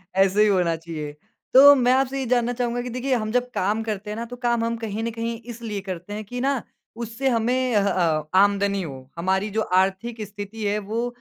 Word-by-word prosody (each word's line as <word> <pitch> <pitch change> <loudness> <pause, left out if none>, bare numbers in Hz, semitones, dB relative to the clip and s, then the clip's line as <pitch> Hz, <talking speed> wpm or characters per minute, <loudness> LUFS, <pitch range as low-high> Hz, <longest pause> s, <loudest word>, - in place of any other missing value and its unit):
ऐसे 195 +2 +4
ही 215 - +6
होना 180 -5 +2
चाहिए। 160 -2 -6 0.4
तो 280 +2 +10
मैं 250 -2 +3
आपसे 270 +1 +1
ये 265 - -2
जानना 245 0 +1
चाहूँगा 245 0 -1
कि 250 - -5
देखिए 255 +2 -2
हम 215 -2 -2
जब 250 0 0
काम 210 +4 0
करते 210 -2 -4
हैं 210 - -4
ना, 230 - -3
तो 245 +1 -8
काम 240 -2 0
हम 230 0 -1
कहीं 225 -1 -4
न 230 - -2
कहीं 230 0 -4
इसलिए 225 -3 -6
करते 185 0 -6
हैं 215 +1 -4
कि 245 +4 -5
ना, 270 -1 +1 0.3
उससे 235 +3 -2
हमें 250 +1 +1
अह 200 -1 +3
अ, 160 -5 +1
आमदनी 200 0 +3
हो, 135 -5 -8
हमारी 190 +4 0
जो - - +3 0.2
आर्थिक 215 +4 -2
स्थिति 205 +2 -7
है, 205 +1 +1
वो 220 +4 -2
220 Hz, 220 wpm, -24 LUFS, 195-240 Hz, 0.4 s, तो